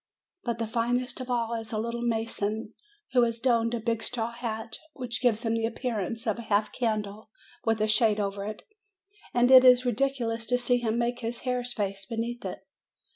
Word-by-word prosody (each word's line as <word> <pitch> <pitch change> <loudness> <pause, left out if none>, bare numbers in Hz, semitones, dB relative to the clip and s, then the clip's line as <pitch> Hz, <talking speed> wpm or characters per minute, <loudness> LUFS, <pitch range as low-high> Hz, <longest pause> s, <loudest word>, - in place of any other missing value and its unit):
But 235 -2 -2
the 230 - -1
finest 245 +3 -1
of 255 - -7
all 235 -2 0
is 225 -1 -4
the 220 - -2
little 235 +2 -2
mason, 225 -2 -2 0.4
who 255 -1 +5
has 230 -1 +1
donned 235 -1 +2
a - - -2
big 230 0 -1
straw 235 -1 -2
hat, 225 -1 -5
which 250 -2 -4
gives 240 -2 +2
him 225 - +1
the 225 0 +1
appear 235 -1 -3
ance 225 +5 -4
of 220 0 0
a - - -4
half 210 -1 +1
candle 215 -3 -2 0.4
with 225 -1 +2
a 215 - +3
shade 215 -1 +4
over 200 -1 -2
it; 215 0 -6 0.7
and 245 +1 +3
it 260 -1 +10
is 250 0 +7
ridiculous 235 -2 0
to 245 +2 +3
see 245 0 +3
him 230 -1 -1
make 240 +1 0
his 230 0 -4
hare's 250 -1 -1
face 195 -2 -3
beneath 235 +2 -3
it. - - -6
230 Hz, 200 wpm, -28 LUFS, 220-245 Hz, 0.7 s, it